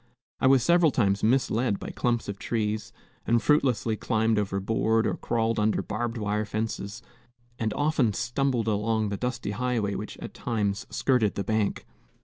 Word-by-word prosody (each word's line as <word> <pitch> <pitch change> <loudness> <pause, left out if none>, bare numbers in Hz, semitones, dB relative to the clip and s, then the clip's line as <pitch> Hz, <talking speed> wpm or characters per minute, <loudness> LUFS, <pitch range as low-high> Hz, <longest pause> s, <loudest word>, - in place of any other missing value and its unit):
I - - +3
was 130 -2 +5
several 170 0 +5
times 100 -7 +1
misled 120 -2 +2
by - - -7
clumps 120 -2 -1
of 100 -1 -5
trees, 110 0 -2 0.4
and 115 +1 +4
fruitlessly 120 -6 +2
climbed 110 0 +1
over 100 -1 -1
board 110 +2 +1
or - - +1
crawled 115 -1 0
under 105 0 +1
barbed 115 +3 -3
wire 105 0 -1
fences, 110 +1 -4 0.6
and 110 -1 0
often 145 -6 +2
stumbled 120 0 0
along 110 0 +1
the 100 - -2
dusty 125 -3 -3
highway 115 -2 -1
which 105 +1 -6
at - - -8
times 105 -4 -2
skirted 125 -6 +1
the 100 - -2
bank. 110 +1 -1
110 Hz, 160 wpm, -27 LUFS, 105-120 Hz, 0.6 s, was